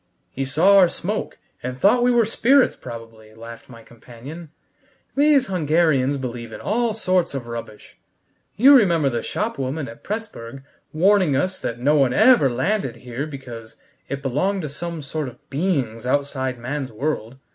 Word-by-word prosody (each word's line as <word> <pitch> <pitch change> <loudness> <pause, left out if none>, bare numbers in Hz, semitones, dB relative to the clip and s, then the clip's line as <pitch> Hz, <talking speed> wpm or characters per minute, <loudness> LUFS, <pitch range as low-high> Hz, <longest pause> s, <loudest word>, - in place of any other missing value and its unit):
"He 135 +6 -3
saw 165 +9 +4
our 180 -2 +6
smoke, 205 +6 -4 0.2
and 125 +1 -5
thought 205 - +4
we 245 - +3
were 240 -2 +4
spirits 255 +5 +3
probably," 115 -2 -11
laughed 115 0 -11
my 115 -2 -13
companion. 125 +9 -11 0.7
"These 285 -1 +4
Hungarians 155 -6 +1
believe 120 -3 -6
in - - -8
all 230 +1 -1
sorts 185 -7 0
of 130 -3 -4
rubbish: 115 -2 -9 0.6
you 270 +6 +7
remember 170 - +3
the 120 -1 -2
shopwoman 145 - -3
at 115 - -12
Pressburg 135 - -6 0.3
warning 185 -2 +3
us 185 +7 -1
that 115 - -4
no 145 +5 +2
one 135 -3 +3
ever 220 - +5
landed 130 - -1
here 125 +4 -4
because 120 -6 -9 0.3
it 140 0 -4
belonged 180 +9 -1
to 150 - -4
some 170 +2 -6
sort 150 +1 -4
of 125 -1 -13
beings 135 - -1
outside 130 -2 -1
man's 130 +3 -4
world! 120 -1 -3
140 Hz, 155 wpm, -22 LUFS, 120-185 Hz, 0.7 s, you